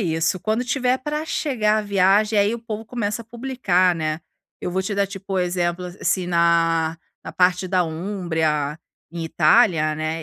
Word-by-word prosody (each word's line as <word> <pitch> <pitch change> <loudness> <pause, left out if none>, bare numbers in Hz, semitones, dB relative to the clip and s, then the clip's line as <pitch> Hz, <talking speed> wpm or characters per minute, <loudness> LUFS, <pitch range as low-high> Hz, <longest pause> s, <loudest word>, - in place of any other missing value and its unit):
é - - 0
isso, 165 0 0
quando 220 +5 -1
tiver 255 0 +1
pra 300 +3 -3
chegar 225 -10 0
a - - -1
viagem, 205 +2 +3
aí 205 +3 +2
o - - -5
povo 225 -1 -6
começa 220 -1 -3
a - - -23
publicar, 225 -7 +1
né. 155 -1 -2 0.4
Eu - - -3
vou 190 +2 -1
te 200 +2 -3
dar, 200 0 +1
tipo, 195 0 -7
o - - +1
exemplo, 175 0 -1
a - - -6
assim 180 0 -1
na 165 -1 +2 0.3
na - - -7
parte 180 0 +2
da 185 0 +2
Umbria, 160 -4 -2 0.3
em 170 0 -5
Itália, 160 -1 +3
né, 155 +1 -3
185 Hz, 190 wpm, -22 LUFS, 165-215 Hz, 0.4 s, viagem